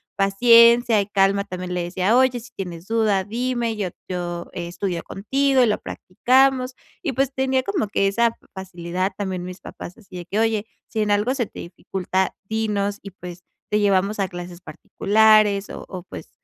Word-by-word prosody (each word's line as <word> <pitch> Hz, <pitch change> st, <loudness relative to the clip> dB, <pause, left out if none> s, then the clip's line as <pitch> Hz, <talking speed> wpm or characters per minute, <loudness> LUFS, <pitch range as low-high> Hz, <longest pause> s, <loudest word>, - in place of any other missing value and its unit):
paciencia 230 Hz, +3 st, +5 dB
y 200 Hz, -, -4 dB
calma 200 Hz, 0 st, +2 dB
también 180 Hz, -2 st, -6 dB
le 180 Hz, -, -1 dB
decía: 185 Hz, +5 st, +1 dB
"Oye, 255 Hz, -1 st, +3 dB
si 240 Hz, +1 st, -14 dB
tienes 175 Hz, -2 st, -6 dB
duda, 215 Hz, -4 st, +1 dB
dime, 235 Hz, +1 st, -2 dB
yo 200 Hz, -4 st, -2 dB, 0.2 s
yo 175 Hz, -1 st, -4 dB
estudio 175 Hz, 0 st, -4 dB
contigo 265 Hz, +6 st, +1 dB
y -, -, +5 dB
lo 210 Hz, -, 0 dB
practicamos". 255 Hz, +5 st, +1 dB, 0.3 s
Y 295 Hz, -7 st, -2 dB
pues, 270 Hz, +1 st, 0 dB
tenía 265 Hz, -1 st, +1 dB
como 340 Hz, -, -1 dB
que 195 Hz, -1 st, +1 dB
esa 230 Hz, +3 st, +1 dB, 0.2 s
facilidad. 185 Hz, 0 st, -3 dB
También 190 Hz, -3 st, -3 dB
mis 180 Hz, 0 st, -8 dB
papás 180 Hz, -, -9 dB
así 190 Hz, -5 st, -12 dB
de 175 Hz, -, -7 dB
que: 200 Hz, +4 st, -4 dB
"Oye, 225 Hz, -1 st, +1 dB, 0.2 s
si 220 Hz, -, -2 dB
en 210 Hz, -, 0 dB
algo 210 Hz, +5 st, +2 dB
se 240 Hz, -5 st, -1 dB
te -, -, -12 dB
dificulta, 185 Hz, +1 st, -3 dB
dinos, 205 Hz, -1 st, -1 dB
y 200 Hz, -, -9 dB
pues 180 Hz, -1 st, -10 dB, 0.3 s
te 210 Hz, -, +3 dB
llevamos 200 Hz, +1 st, +1 dB
a 195 Hz, -, +1 dB
clases 175 Hz, -1 st, -9 dB
particulares", 210 Hz, 0 st, +3 dB
o -, -, -8 dB
o, 185 Hz, -3 st, -7 dB
pues -, -, -10 dB
205 Hz, 180 wpm, -22 LUFS, 185-235 Hz, 0.3 s, paciencia